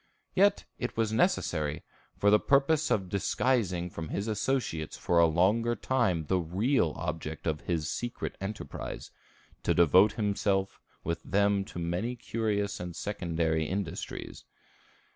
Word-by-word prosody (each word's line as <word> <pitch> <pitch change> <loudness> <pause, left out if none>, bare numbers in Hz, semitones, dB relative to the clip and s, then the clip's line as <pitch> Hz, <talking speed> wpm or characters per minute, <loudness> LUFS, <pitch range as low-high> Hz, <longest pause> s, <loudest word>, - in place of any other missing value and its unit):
Yet 200 +1 +3
it 125 - -4
was 110 -1 +1
necessary, 75 -7 +1 0.3
for 100 - +4
the 105 - +6
purpose 145 +3 +3
of 95 -3 +1
disguising 95 -2 0
from 80 -1 -6
his 100 +3 -2
associates 105 - -1
for 85 - +2
a 85 - +7
longer 105 +9 +2
time 110 -14 0
the 95 +4 +1
real 90 - +1
object 80 0 -4
of 75 -2 -1
his 80 -3 -1
secret 120 +6 -4
enterprise, 105 +2 -6 0.5
to - - +1
devote 90 +5 +6
himself 100 -2 0 0.2
with 85 +1 -2
them 100 0 +2
to 105 - -10
many 85 +8 -2
curious 105 -3 -2
and 90 -1 -6
secondary 85 -5 -1
industries. 95 +1 -5
95 Hz, 135 wpm, -29 LUFS, 85-110 Hz, 0.5 s, a